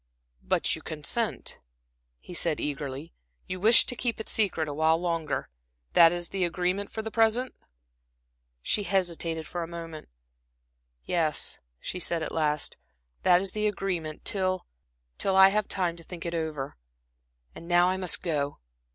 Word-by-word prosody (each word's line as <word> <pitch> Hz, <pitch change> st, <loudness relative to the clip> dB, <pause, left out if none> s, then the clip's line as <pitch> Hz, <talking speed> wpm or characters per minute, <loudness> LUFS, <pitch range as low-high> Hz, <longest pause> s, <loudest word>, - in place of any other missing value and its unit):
"But -, -, +2 dB
you -, -, -10 dB
consent," -, -, -2 dB, 0.6 s
he -, -, -10 dB
said 170 Hz, -2 st, +1 dB
eagerly. 145 Hz, +1 st, -4 dB, 0.3 s
"You 185 Hz, -, -5 dB
wish 225 Hz, +5 st, +7 dB
to 250 Hz, -, -2 dB
keep 235 Hz, -2 st, -2 dB
it 220 Hz, -, -5 dB
secret, 185 Hz, -7 st, +1 dB
awhile 160 Hz, +2 st, +2 dB
longer? 165 Hz, -3 st, -2 dB, 0.4 s
That 165 Hz, -1 st, +8 dB
is 175 Hz, -1 st, -1 dB
the 195 Hz, -1 st, -1 dB
agreement 180 Hz, +3 st, -1 dB
for 220 Hz, -, -4 dB
the 220 Hz, -, -5 dB
present?" 230 Hz, +3 st, +2 dB, 1.1 s
She 210 Hz, -, +1 dB
hesitated 170 Hz, -4 st, -1 dB
for 175 Hz, -, -4 dB
a 165 Hz, -, -3 dB
moment. 165 Hz, -, -8 dB, 1.0 s
"Yes," 160 Hz, -4 st, +1 dB, 0.2 s
she 180 Hz, -, -5 dB
said 170 Hz, -2 st, 0 dB
at -, -, -4 dB
last, 150 Hz, -2 st, 0 dB, 0.4 s
"that 180 Hz, 0 st, +5 dB
is 195 Hz, -1 st, +1 dB
the 215 Hz, 0 st, 0 dB
agreement, 180 Hz, -6 st, -3 dB
till 185 Hz, -3 st, 0 dB, 0.5 s
till 195 Hz, -, +1 dB
I 190 Hz, 0 st, +9 dB
have 210 Hz, +1 st, 0 dB
time 180 Hz, -3 st, 0 dB
to 165 Hz, -, -8 dB
think 170 Hz, 0 st, -9 dB
it 170 Hz, -, -2 dB
over. 155 Hz, -4 st, -3 dB, 0.8 s
And 170 Hz, -, -11 dB
now 175 Hz, 0 st, +5 dB
I 185 Hz, -, 0 dB
must 185 Hz, -2 st, 0 dB
go." 145 Hz, -4 st, -1 dB
175 Hz, 155 wpm, -28 LUFS, 160-195 Hz, 1.1 s, I